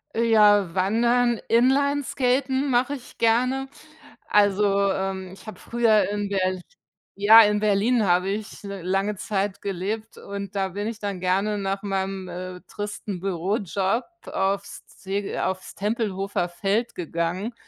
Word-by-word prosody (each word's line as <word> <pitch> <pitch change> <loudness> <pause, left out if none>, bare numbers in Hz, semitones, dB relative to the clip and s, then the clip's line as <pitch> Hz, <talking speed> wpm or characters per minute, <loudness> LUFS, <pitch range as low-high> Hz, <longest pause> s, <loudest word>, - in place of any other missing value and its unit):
Äh, 230 - +1
ja, 205 -5 +5
Wandern, 235 +5 +2
Inlineskaten 265 +1 +2
mache 250 +3 +2
ich 255 - -13
gerne. 255 +4 +2 0.6
Also, 200 -1 +3
ähm, 190 -1 -3
ich 195 - -15
habe 215 - -8
früher 220 -5 +2
in 205 -1 -2
Berl 185 -2 0 0.5
ja, 215 +3 +8
in 210 0 +2
Berlin 215 +3 +2
habe 180 +2 +2
ich 210 +1 -5
l 200 -2 -6
lange 195 +3 0
Zeit 200 -1 -2
gelebt 205 +4 -4
und 200 0 -7
da 195 -1 0
bin 205 +3 -4
ich 225 -1 -4
dann 200 -3 -4
gerne 195 +3 0
nach 195 0 -2
meinem, 195 -1 -3
äh, 180 +1 -7
tristen 205 -2 -5
Bürojob 195 +4 -1 0.3
aufs 200 +1 -2
Ze 195 +1 -4
aufs 185 -1 -4
Tempelhofer 200 -3 -1
Feld 200 +6 -1
gegangen 175 +6 -3
200 Hz, 135 wpm, -24 LUFS, 190-225 Hz, 0.6 s, ja